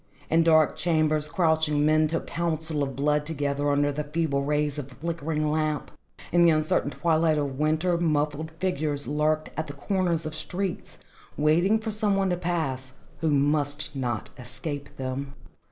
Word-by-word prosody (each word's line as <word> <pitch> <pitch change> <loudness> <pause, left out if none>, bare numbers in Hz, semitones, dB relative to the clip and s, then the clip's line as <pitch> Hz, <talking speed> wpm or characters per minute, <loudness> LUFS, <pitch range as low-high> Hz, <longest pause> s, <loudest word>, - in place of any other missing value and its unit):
In 165 +1 +5
dark 160 -2 +4
chambers 155 -3 +1
crouching 160 -4 +2
men 155 0 +4
took 165 +2 -2
counsel 160 -2 -2
of 135 -2 -2
blood 150 +1 +1
together 145 -2 -1
under 145 0 +2
the 150 +2 -3
feeble 150 -2 -1
rays 150 0 0
of 140 -1 -7
a - - -13
flickering 155 0 -2
lamp. 155 -1 -1 0.4
In 175 - +4
the 170 - +7
uncertain 155 -2 +2
twilight 160 0 +2
of 140 -2 -2
winter, 160 +3 +1
muffled 155 -1 0
figures 150 -5 -1
lurked 155 +1 0
at 155 - -3
the 145 - -6
corner 185 +4 0
of 155 -1 -3
streets, 180 +3 -4 0.4
waiting 170 +8 +3
for 220 0 -4
some 210 -1 +1
one 195 -1 +1
to 175 - 0
pass, 145 -7 -2 0.3
who 160 0 +1
must 145 0 0
not 120 -5 -3
escape 145 +3 -5
them. 135 +1 -4
155 Hz, 165 wpm, -26 LUFS, 145-165 Hz, 0.4 s, the